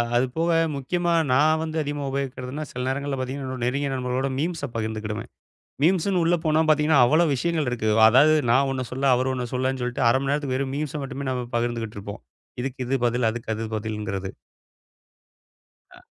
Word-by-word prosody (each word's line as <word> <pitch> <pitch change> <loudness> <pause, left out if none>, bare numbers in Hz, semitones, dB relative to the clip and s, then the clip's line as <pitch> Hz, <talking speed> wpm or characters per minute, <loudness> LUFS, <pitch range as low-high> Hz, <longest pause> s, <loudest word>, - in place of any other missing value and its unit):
அது 120 +2 +4
போக 165 +1 +2 0.2
முக்கியமா 175 +6 -1 0.2
நான் 155 +4 +4
வந்து 160 0 -4
அதிகமா 145 -1 -3
உபயோகிக்கிறதுன்னா 135 +1 -4
சில 125 0 -4
நேரங்கள்ல 140 +1 -2
பாத்தீங்கன்னா 130 +1 -4
என்னோட 130 -2 -4
நெருங்கிய 140 +3 0
நண்பர்களோட 130 +1 -1
மீம்ஸ்ஸ 160 0 -2
பகிர்ந்துக்கிடுவேன். 110 -1 -4 0.5
மீம்ஸ்ன்னு 180 +2 +2
உள்ள 170 +2 +3
போனா 155 0 +3
பாத்தீங்கன்னா, 150 -1 +4
அவ்ளோ 155 +7 +4
விஷயங்கள் 160 +1 -1
இருக்கு. 115 -3 -2 0.2
அதாவது 135 +7 +6 0.2
நான் 135 +3 +4
ஒண்ணு 130 -1 -2
சொல்ல 135 +2 -2
அவர் 130 +1 0
ஒண்ணு 125 -1 -3
சொல்லன்னு 130 0 -1
சொல்ட்டு, 125 +1 -2
0:30 125 - +4
மணி 140 0 -1
நேரத்துக்கு 140 -3 -1
வெறும் 135 0 -2
மீம்ஸ 150 -1 -3
மட்டுமே 135 0 -5
நம்ம 125 -1 -2
பகிர்ந்து 120 -1 -1
கிட்டு 105 -2 -7
இருப்போம். 100 +1 -8 0.4
இதுக்கு 130 0 -4
இது 135 - +1
பதில். 120 0 +1
அதுக்கு 115 -1 -4
பதில்ங்குறது. 105 -3 -4 1.6
அ. - - -18
130 Hz, 170 wpm, -24 LUFS, 125-145 Hz, 1.6 s, அதாவது